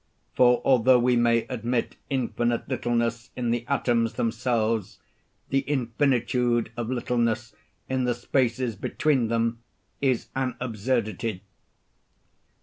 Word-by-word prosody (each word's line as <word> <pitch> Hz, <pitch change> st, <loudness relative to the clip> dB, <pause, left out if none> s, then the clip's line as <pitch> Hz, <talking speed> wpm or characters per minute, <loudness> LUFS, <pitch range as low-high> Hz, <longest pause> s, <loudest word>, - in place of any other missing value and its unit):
For 125 Hz, -1 st, +4 dB
although 130 Hz, -1 st, +5 dB
we 125 Hz, +1 st, +3 dB
may 120 Hz, -1 st, +3 dB
admit 120 Hz, -1 st, -2 dB
infinite 120 Hz, -3 st, -1 dB
littleness 115 Hz, -1 st, -1 dB
in 120 Hz, -2 st, -1 dB
the 120 Hz, 0 st, -1 dB
atoms 120 Hz, -4 st, +1 dB
themselves, 115 Hz, -2 st, -1 dB, 0.5 s
the 135 Hz, -, +2 dB
infinitude 120 Hz, -3 st, +1 dB
of 120 Hz, -1 st, -3 dB
littleness 120 Hz, -2 st, -1 dB, 0.3 s
in 130 Hz, -1 st, 0 dB
the 120 Hz, -1 st, +1 dB
spaces 120 Hz, -1 st, 0 dB
between 130 Hz, +4 st, 0 dB
them 115 Hz, 0 st, 0 dB, 0.4 s
is 130 Hz, -4 st, +1 dB
an 130 Hz, -2 st, -1 dB
absurdity. 110 Hz, -4 st, -2 dB
120 Hz, 110 wpm, -26 LUFS, 115-125 Hz, 0.5 s, although